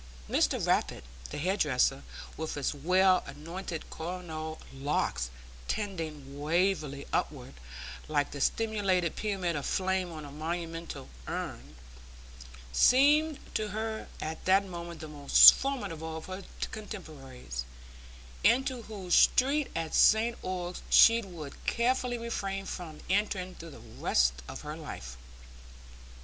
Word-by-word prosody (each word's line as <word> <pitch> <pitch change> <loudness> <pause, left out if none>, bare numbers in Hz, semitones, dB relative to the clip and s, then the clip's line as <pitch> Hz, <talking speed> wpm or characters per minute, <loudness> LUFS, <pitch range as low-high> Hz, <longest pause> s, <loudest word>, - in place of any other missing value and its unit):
Mr - - +2
Rappit, - - 0 0.3
the - - -6
hair 180 +6 0
dresser, 135 -5 +2 0.3
with 160 0 -4
his 145 0 -1
well 185 +5 +3
anointed 165 +4 -6
coronal 160 -2 -5
locks 135 - -1 0.4
tending 160 -9 -4
wavily 155 -3 0
upward, 130 -3 -2 0.5
like 145 -2 0
the 140 - -6
simulated 195 - +1
pyramid 190 -5 -1
of 145 - -3
flame 185 0 0
on 155 -2 -7
a 145 - -9
monumental 165 -1 -5 0.2
urn, 70 +4 -5 1.0
seemed 290 - +5 0.2
to 215 - -1
her 220 +2 -4
at 160 +1 -5
that 195 +1 +4
moment 170 -2 -7
the 155 - -6
most 145 -2 +9
formidable 175 - -4
of 160 - -8
her 185 +1 -7 0.3
contemporaries, 135 - -7 0.8
into 255 +1 +3
whose 200 -5 -5
street 280 +3 +4
at 165 -1 -3
St 225 +2 +5
Ogg's 180 -1 -4
she 230 0 +7
would 170 -8 -9
carefully 245 +1 +1
refrain 195 -4 -3
from 165 -6 -7
entering 190 -2 0
through 165 -1 -10
the 145 - -12
rest 65 0 +1
of - - -7
her - - -6
life. - - -8
175 Hz, 125 wpm, -30 LUFS, 150-205 Hz, 1.0 s, most